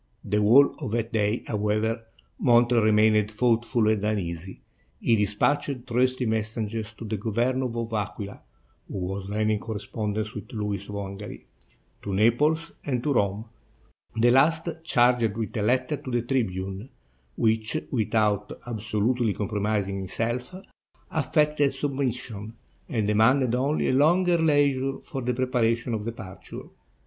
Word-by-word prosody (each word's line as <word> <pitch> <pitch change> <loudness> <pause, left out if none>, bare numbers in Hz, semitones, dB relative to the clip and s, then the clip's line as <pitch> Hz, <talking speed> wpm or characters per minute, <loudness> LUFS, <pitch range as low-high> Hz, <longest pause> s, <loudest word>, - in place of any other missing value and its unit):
The 105 +1 +1
whole 125 +7 +6
of - - -4
that 115 +1 -2
day, 105 +1 +1
however, 110 +2 0 0.4
Montreal 120 -2 +4
remained 110 -1 +4
thoughtful 115 0 +1
and 110 -2 +1
uneasy; 95 -4 -3 0.4
he 115 - +3
dispatched 120 +5 0
trusty 125 +1 +1
messengers 110 0 -2
to 115 - -7
the 110 0 -2
Governor 120 +5 0
of 115 -1 -4
Aquila 100 -1 -4 0.5
(who - - -6
was 95 +1 -4
then 110 +1 +1
in 105 - +1
correspond 105 -1 -4
ence 110 0 -3
with 105 - -8
Louis 105 -3 -3
of 105 - -5
Hungary), 100 +1 -7 0.6
to 100 -2 -3
Naples, 150 +10 +2
and 125 -4 -2
to 145 - +1
Rome, 100 -1 0 0.4
— - - -37
the 120 +1 +5
last 160 +6 +3
charged 120 -7 +3
with 115 +1 -4
a - - 0
letter 130 +6 +1
to 130 - -9
the 120 -2 0
tribune, 100 -3 -2 0.5
which, 110 +3 +1
without 105 -3 0
absolutely 110 0 0
compromising 105 -1 -1
himself, 120 - -3 0.6
affected 150 -1 +1
sub 140 +1 -2
mission, 115 -5 -4 0.3
and 110 -4 0
demanded 115 +4 +3
only 135 +5 +1
a - - +2
longer 170 +5 +4
leisure 140 -4 +2
for 135 - -6
the 125 0 -1
preparations 120 -2 0
of 105 -1 -3
departure. 100 -7 -8
115 Hz, 140 wpm, -26 LUFS, 105-125 Hz, 0.6 s, whole